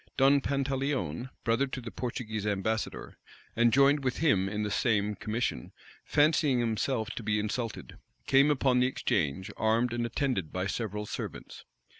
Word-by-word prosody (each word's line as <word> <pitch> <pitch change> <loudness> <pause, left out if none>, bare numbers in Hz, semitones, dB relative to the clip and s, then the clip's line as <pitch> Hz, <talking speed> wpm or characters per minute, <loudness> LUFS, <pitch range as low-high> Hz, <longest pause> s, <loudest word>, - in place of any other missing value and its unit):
Don 140 +1 +5
Pantaleon, 135 - -2
brother 115 +4 +1
to 130 - -5
the 115 -2 -8
Portuguese 110 -4 -4
ambassador, 105 +2 -2 0.4
and 120 0 +4
joined 140 +3 +4
with 130 -1 -1
him 100 - +2
in 105 +1 -2
the 105 - -2
same 105 -2 +1
commission,[*] 105 - -3 0.3
fancying 145 -3 +3
himself 115 +1 -1
to - - -6
be 105 -1 0
insulted, 105 +2 -4 0.3
came 140 +2 +5
upon 130 -3 +2
the 125 - +4
exchange, 95 - -1
armed 115 +2 +1
and 120 0 -1
attended 120 - -1
by 90 0 -2
several 105 0 -3
servants. - - -7
115 Hz, 150 wpm, -29 LUFS, 105-135 Hz, 0.4 s, Don